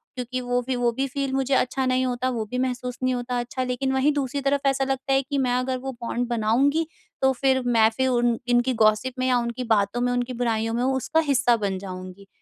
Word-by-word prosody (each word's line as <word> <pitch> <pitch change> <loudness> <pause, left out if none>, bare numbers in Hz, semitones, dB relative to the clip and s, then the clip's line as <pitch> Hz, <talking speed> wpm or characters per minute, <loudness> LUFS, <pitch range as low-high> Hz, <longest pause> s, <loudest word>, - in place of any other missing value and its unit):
क्योंकि 250 0 -4
वो 245 0 0
भी 260 - 0
वो 245 -1 +1
भी 270 - +1
फील 275 0 -3
मुझे 270 0 0
अच्छा 265 +1 +1
नहीं 255 0 +1
होता, 255 0 -1
वो 235 -3 -2
भी 250 - -2
महसूस 250 -1 -2
नहीं 255 0 +2
होता 245 0 -2
अच्छा। 245 +2 -3
लेकिन 255 +1 -1
वहीं 265 +3 +3
दूसरी 280 -1 -2
तरफ 275 0 0
ऐसा 270 0 +2
लगता 270 0 -1
है 270 - +4
कि 280 +1 -4
मैं 255 -2 +1
अगर 255 +1 0
वो 265 +1 -5
बॉन्ड 240 +1 -2
बनाऊँगी, 245 +7 +2 0.4
तो 265 0 +4
फिर 265 +1 +2
मैं 225 -2 +4
फिर 260 0 +2
उन 240 -2 +2
इनकी 245 +1 +2
गॉसिप 215 +4 +2
में 255 - +1
या 250 -1 +3
उनकी 235 +1 -3
बातों 205 +4 0
में, 245 0 +1
उनकी 245 +1 -2
बुराइयों 225 -2 -1
में 240 +1 0
उसका 265 +4 +1
हिस्सा 260 -3 +4
बन 190 -1 -1
जाऊँगी। 185 0 -9
250 Hz, 230 wpm, -24 LUFS, 240-265 Hz, 0.4 s, है